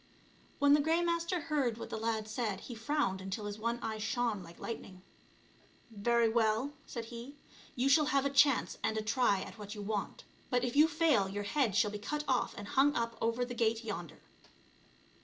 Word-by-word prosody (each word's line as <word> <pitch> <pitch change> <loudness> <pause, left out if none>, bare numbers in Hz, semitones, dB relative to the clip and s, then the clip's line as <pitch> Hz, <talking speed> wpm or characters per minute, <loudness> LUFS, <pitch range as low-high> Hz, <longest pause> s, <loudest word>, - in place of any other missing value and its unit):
When 285 0 +5
the 295 - +5
Grey 325 +3 +2
Master 340 +1 0
heard 280 -7 0
what - - -7
the 220 - -3
lad 220 -1 -1
said, 215 -3 -2
he 245 - -8
frowned 225 -4 -1
until 195 +2 -4
his 205 +1 -5
one 235 +2 -1
eye 220 -1 -3
shone 225 -1 -1
like 170 -1 -12
lightning. 185 -5 -7 0.9
"Very 235 +2 +2
well," 225 +4 +1
said 235 -2 -5
he, 240 +4 -9 0.4
"you 255 +2 +1
shall 300 +2 +5
have 280 -2 +2
a 280 - +1
chance 280 -1 +3
and 220 - 0
a 215 - -1
try 215 -3 +2
at - - -9
what 205 +1 -7
you 205 - -6
want, 205 0 -3 0.3
but 250 -1 +1
if 245 0 -2
you 300 +2 +7
fail 300 -11 +2
your 205 +1 -3
head 230 0 +1
shall 215 -1 +3
be 210 - -5
cut 295 +8 -3
off 255 -2 +1
and 205 0 -7
hung 285 +2 +3
up 230 0 -1
over 230 +2 +1
the 245 - -6
gate 230 -1 +1
yonder." 175 -7 -6
230 Hz, 200 wpm, -33 LUFS, 215-275 Hz, 0.9 s, you